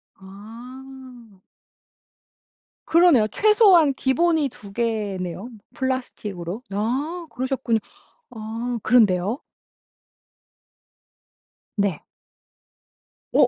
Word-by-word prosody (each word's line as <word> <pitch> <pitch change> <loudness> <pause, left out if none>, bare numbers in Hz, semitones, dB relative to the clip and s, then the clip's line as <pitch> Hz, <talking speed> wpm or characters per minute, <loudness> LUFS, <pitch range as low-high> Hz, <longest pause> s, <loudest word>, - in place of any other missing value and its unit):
아. 235 +3 -13 1.5
그러네요. 330 -10 +5
최소한 385 - +5
기본이 305 +3 +1
2 200 -4 -13
개네요. 205 -4 -3 0.2
플라스틱으로. 215 -7 -4
아 275 - -2
그러셨군요. 255 -3 -1 0.5
아, 230 +2 -4
그런데요? 215 - +3 2.3
네. 200 -7 0 1.3
어. - - +5
240 Hz, 145 characters per minute, -23 LUFS, 205-265 Hz, 2.3 s, 그러네요